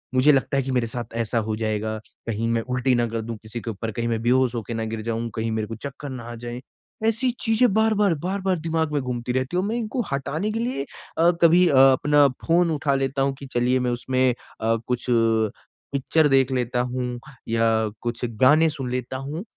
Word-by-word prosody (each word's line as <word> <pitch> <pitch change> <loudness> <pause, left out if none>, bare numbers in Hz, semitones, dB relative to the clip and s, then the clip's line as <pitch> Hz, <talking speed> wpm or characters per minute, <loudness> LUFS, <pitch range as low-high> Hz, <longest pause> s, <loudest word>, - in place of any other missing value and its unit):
मुझे 140 +4 +6
लगता 140 0 +1
है 135 - +2
कि 135 - -3
मेरे 125 -2 +1
साथ 120 -1 -6
ऐसा 115 0 -1
हो 110 - -1
जाएगा, 110 0 -2 0.3
कहीं 115 0 -1
मैं 115 0 +1
उल्टी 125 +2 0
ना 120 0 +1
कर 115 0 -3
दूँ 115 0 -6
किसी 115 +2 -6
के 115 - -4
ऊपर, 110 +3 -5
कहीं 115 +2 -2
मैं 115 -1 -1
बेहोश 125 +1 +2
होके 115 0 -4
ना 115 0 -2
गिर 110 - -3
जाऊँ, 115 +1 -2
कहीं 110 0 -1
मेरे 110 -1 -2
को 115 - -6
चक्कर 140 +4 -7
ना 125 -2 -6
आ - - -6
जाएँ। 120 +1 -7 0.5
ऐसी 230 +3 +1
चीज़ें 225 -1 +3
बार-बार, 215 -3 +3
बार-बार 190 +3 -1
दिमाग 160 -1 -1
में 145 - +1
घूमती 125 -1 -3
रहती 130 +6 -1
हूँ 185 - +1
और - - -1
मैं 225 - -1
इनको 235 +2 -2
हटाने 145 +9 -2
के 225 - -2
लिए 235 - -2 0.3
अ, 170 +2 +5
कभी 175 +2 +6
अ, 150 - +2
अपना 140 +2 +6 0.2
फ़ोन 170 0 +3
उठा 145 -2 0
लेता 135 0 -1
हूँ 135 0 +1
कि 140 - -8
चलिए 125 +1 +2
मैं 125 -1 0
उसमें 130 +1 +1 0.3
अ, 115 +1 +2
कुछ 125 -1 -2 0.9
पिक्चर 150 +3 +2
देख 135 -1 +3
लेता 125 -1 0
हूँ 125 -1 -3 0.3
या 115 0 +2 0.4
कुछ 120 0 -4 0.2
गाने 155 +5 +6
सुन 135 -4 -5
लेता 125 +1 -3
हूँ। 145 +7 -5
130 Hz, 220 wpm, -24 LUFS, 115-155 Hz, 0.9 s, मुझे